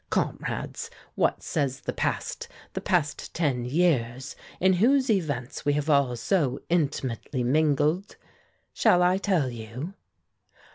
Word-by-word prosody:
Comrades, - - -2 0.2
what - - +1
says 135 -1 -1
the - - -3
past, 475 - -2 0.3
the - - -3
past 170 -6 -1
ten 140 -7 0
years, 130 -4 0 0.2
in 190 +1 +4
whose 260 +1 +4
events 145 - -2
we 145 - +2
have 150 +1 0
all 140 -4 +3
so 135 - 0
intimately 140 -6 -1
mingled? 155 +7 +2 0.6
Shall 180 0 +4
I 180 +2 +3
tell 180 -11 +1
you?" 120 - -7
145 Hz, 125 wpm, -27 LUFS, 130-180 Hz, 0.6 s, in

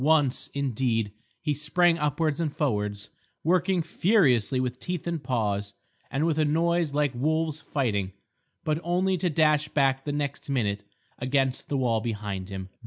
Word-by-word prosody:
Once, 150 -4 +2
indeed, 120 -5 0 0.3
he 150 - +1
sprang 165 +4 +3
upwards 150 +1 0
and 155 -4 -1
forwards, 105 - -1 0.3
working 180 +1 +2
furiously 145 - +3
with 125 0 -2
teeth 180 -3 -4
and 170 -4 -2
paws, 105 -5 -1 0.3
and 145 +4 0
with 160 -2 +1
a - - +4
noise 165 +1 +2
like 145 -1 +1
wolves 155 +4 0
fighting, 110 -10 -1 0.5
but 155 0 0
only 185 +2 +1
to 180 0 0
dash 155 -1 +3
back 135 -2 +2
the 145 - -2
next 145 -1 -3
minute 105 -7 0 0.4
against 130 0 0
the 140 - 0
wall 115 -4 +1
behind 105 -4 -4
him. 95 -1 -5
145 Hz, 155 wpm, -27 LUFS, 120-160 Hz, 0.5 s, a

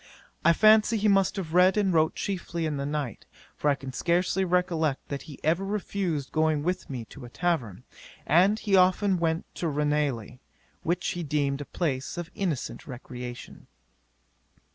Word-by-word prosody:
I 170 - +6
fancy 215 +5 +5
he 215 +1 +1
must 195 -2 +3
have 175 -5 -5
read 185 +2 +5
and 195 -3 +2
wrote 160 -1 +3
chiefly 170 -4 -3
in 150 -2 -2
the 140 0 -2
night, 145 -6 -4 0.3
for 150 - 0
I 140 - +3
can 135 -1 -8
scarcely 180 +6 +1
recollect 170 -5 0
that 140 -2 -4
he 140 - -10
ever 170 +5 +2
refused 195 -7 -2
going 155 -2 +1
with 180 +3 -2
me 125 -4 -5
to 140 - -11
a 120 - -9
tavern, 125 - -2 0.4
and 190 +7 +4
he 205 -3 +1
often 185 +1 +4
went 165 0 0
to 170 - -3
Ranelagh, 145 -5 -1 0.4
which 175 +2 -1
he 175 - -3
deemed 145 -2 -1
a - - -5
place 140 -1 -3
of 175 -1 -5
innocent 180 - -3
recreation. 125 -1 -8
165 Hz, 165 wpm, -27 LUFS, 140-185 Hz, 0.4 s, I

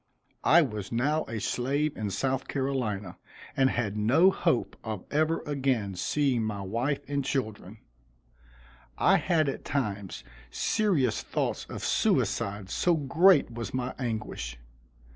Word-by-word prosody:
I 170 +2 +6
was 105 -7 -5
now 145 +7 +1
a 115 -1 -4
slave 140 +7 -1
in 105 -2 -3
South 130 +7 -1
Carolina, 125 -9 -2 0.4
and 135 -1 +4
had 110 -5 -1
no 135 - +4
hope 125 - 0
of 110 -5 -5
ever 155 +2 +1
again 130 -8 0
seeing 130 +5 0
my 105 -2 -3
wife 120 +9 -1
and 140 -1 -1
children. 110 -6 -3 1.2
I - - +5
had 160 -4 +1
at 135 - -3
times 105 - -3 0.3
serious 180 - +1
thoughts - - -2
of - - -6
suicide 100 -1 0
so 175 -1 +2
great 160 +1 +4
was 115 +1 -5
my 130 0 -2
anguish. 110 - -4
130 Hz, 130 wpm, -28 LUFS, 105-145 Hz, 1.2 s, I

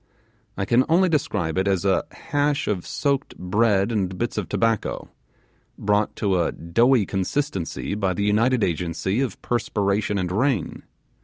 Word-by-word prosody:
I 100 - -1
can 120 +6 +4
only 180 +3 +4
describe 95 - 0
it 95 - 0
as 95 -1 +1
a 95 -1 +2
hash 145 -2 -1
of 95 -4 -2
soaked 140 -1 -1
bread 100 +2 +2
and 95 -4 -1
bits 120 +3 -2
of - - -3
tobacco, 115 -2 -1 0.7
brought 105 +1 +1
to 95 -4 +1
a 85 - 0
doughy 115 +7 +2
consistency 95 - -2
by 95 -3 -1
the 100 - -1
united 115 +4 +2
agency 90 - -1
of 130 -8 -3
perspiration 105 -3 0
and 90 -2 -2
rain. 115 - 0
105 Hz, 150 wpm, -23 LUFS, 95-125 Hz, 0.7 s, can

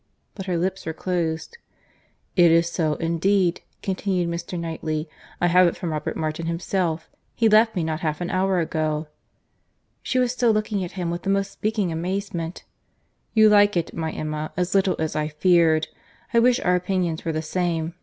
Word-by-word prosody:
but 195 -2 -7
her 180 -2 0
lips 185 +1 -2
were 160 - -2
closed. 170 - -3 0.8
"It 175 -2 +6
is 165 +1 +4
so, 160 -3 0
indeed," 175 +2 +1 0.2
continued 185 -2 -1
Mr. 170 +1 -4
Knightley; 160 -1 -3 0.3
"I - - +2
have 180 +1 +5
it 170 - -1
from 170 - -3
Robert 150 -1 -3
Martin 155 +1 -3
himself. 170 -1 -1 0.3
He 230 - +3
left 220 +1 +5
me 175 - 0
not 160 -1 -2
half 155 -2 -2
an 175 0 -3
hour 190 0 +1
ago." 155 -2 -1 0.9
She 255 - -2
was 250 -1 +2
still 245 -1 +2
looking 215 -2 -1
at 175 - -6
him 175 -3 -2
with 175 +1 -4
the 195 - -3
most 195 0 +1
speaking 210 -4 -1
amazement. 175 0 -3 0.7
"You 220 0 +7
like 205 -2 +5
it, 170 - -2
my 160 -1 -3
Emma, 155 0 -4
as 180 0 0
little 195 -1 +3
as 160 -1 -2
I 155 0 0
feared.—I 165 +7 +1
wish 250 +2 +4
our 180 - +2
opinions 180 -3 -1
were 165 - -1
the 155 0 -2
same. 165 -1 -1
175 Hz, 180 wpm, -24 LUFS, 160-195 Hz, 0.9 s, You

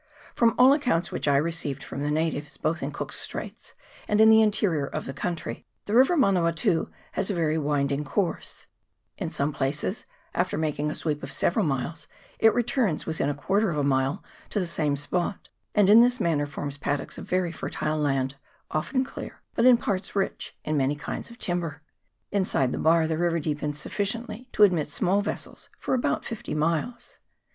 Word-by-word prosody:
From 230 -1 +3
all 250 +1 +8
the 285 - +5
accounts 215 - 0
which - - -3
I 140 -1 +4
received 145 -3 -1
from 135 - -6
the 145 +1 -1
natives, 150 -1 -1
both 160 0 -1
in 140 - -2
Cook's - - -5
Straits - - -7 0.3
and 210 - +2
in 220 0 +8
the 220 0 +7
interior 195 -9 +2
of - - -4
the 135 - -5
country, 170 +3 -4 0.2
the 205 - -3
river 265 +9 +5
Manawatu 180 - +2 0.2
has 195 +1 -1
a 200 - 0
very 160 -2 +1
wind 145 -2 0
ing 140 +1 -1
course; 180 +4 -3 0.5
in 180 -5 -2
some 145 -1 -1
places, 145 - -2 0.3
after 180 +1 0
making 150 -1 -1
a - - -4
sweep 150 -2 -2
of - - -6
several 145 - +1
miles, 155 +2 -2 0.3
it 225 - +6
returns 235 - +1
within 160 -3 -1
a 145 - -1
quarter 195 +8 +1
of 155 - -2
a 145 - +1
mile 135 0 +1 0.3
to 210 - -1
the 185 - 0
same 155 -4 0
spot, 175 +7 -2 0.3
and 205 -2 +5
in 215 +3 +9
this 245 +1 +3
manner 150 -4 +1
forms 145 0 -5
paddocks 145 +1 -2
of - - -9
very 180 -2 +1
fertile 155 -1 -3
land, 135 -2 0 0.3
often 255 - 0
clear, 260 - -9
but 230 - +2
in 250 -2 +8
parts 195 -4 -3
rich 195 - -2
in 155 - -1
many 140 0 +1
kinds 145 - -5
of 235 - -13
timber. 170 -7 -2 0.5
Inside 185 -10 +1
the - - -3
bar 165 0 +4
the 160 0 -1
river 170 -1 +1
deepens 150 -1 -2
sufficiently 215 - -3
to 210 - +5
admit 175 -7 +4
small 190 +7 +1
vessels 205 - -6
for - - -2
about 255 - 0
fifty 225 -8 -5
miles. 165 +10 -2
165 Hz, 190 wpm, -26 LUFS, 145-205 Hz, 0.5 s, in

